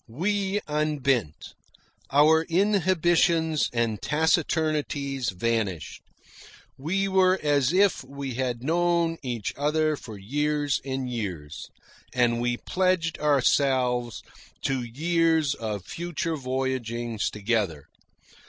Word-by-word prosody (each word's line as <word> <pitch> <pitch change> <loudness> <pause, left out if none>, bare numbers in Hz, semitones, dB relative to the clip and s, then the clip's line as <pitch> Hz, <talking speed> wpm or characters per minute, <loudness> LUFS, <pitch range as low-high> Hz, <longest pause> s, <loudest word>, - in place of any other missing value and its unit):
We 195 - -1
unbent. 140 - -1 0.6
Our 155 +3 +5
inhibitions 175 -4 +2
and 115 -3 -1
taciturnities 150 -4 0
vanished. 100 -3 -2 0.7
We 185 +8 -1
were 190 -1 +3
as 145 -2 +2
if 195 -2 +3
we 135 0 -6
had 125 -1 -2
known 170 +1 +1
each 120 -5 -3
other 155 +2 +1
for 110 -6 -10
years 145 +7 -1
and 130 -1 -3
years, 90 -11 -5 0.5
and 120 -1 +2
we 120 0 0
pledged 185 -1 0
ourselves 130 -4 +1 0.4
to 135 -2 0
years 160 +4 +1
of 105 -6 -5
future 170 -1 -3
voyagings 130 -4 -2
together. 100 -8 -1
140 Hz, 95 wpm, -26 LUFS, 120-165 Hz, 0.7 s, Our